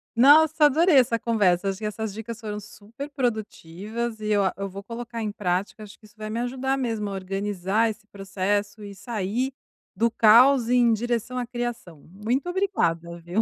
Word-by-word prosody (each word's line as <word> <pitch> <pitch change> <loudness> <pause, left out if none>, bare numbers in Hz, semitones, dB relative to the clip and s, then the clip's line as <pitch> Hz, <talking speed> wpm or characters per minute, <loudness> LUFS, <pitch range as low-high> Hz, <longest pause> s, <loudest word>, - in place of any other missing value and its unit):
Nossa, 300 +4 +6
adorei 315 +3 +4
essa 240 -2 +4
conversa. 200 -5 +1
Acho 190 - -3
que 215 - -5
essas 215 -1 -4
dicas 225 +1 -7
foram 210 -2 -5
super 215 +7 -10
produtivas 220 - -4
e 210 - -5
eu 205 -1 +3
a 190 - 0
eu 195 0 -3
vou 200 +2 -9
colocar 230 +1 -6
em 210 -1 -2
prática, 195 +2 -2
acho 210 0 -12
que 215 - -19
isso 210 +1 -20
vai 215 0 -6
me 230 +2 -3
ajudar 265 +2 -1
mesmo 225 -5 -2
a - - -5
organizar 195 +3 -1
esse 215 0 -8
processo 200 +1 -3
e 200 -1 -8
sair 235 +4 -3 0.4
do 230 +4 +2
caos 235 +3 +5
em 245 -2 +4
direção 240 +2 -2
à 245 - -2
criação. 240 - -6
Muito 235 - -2
obrigada, 170 - -1
viu. 175 +6 -1
220 Hz, 185 wpm, -25 LUFS, 200-240 Hz, 0.4 s, Nossa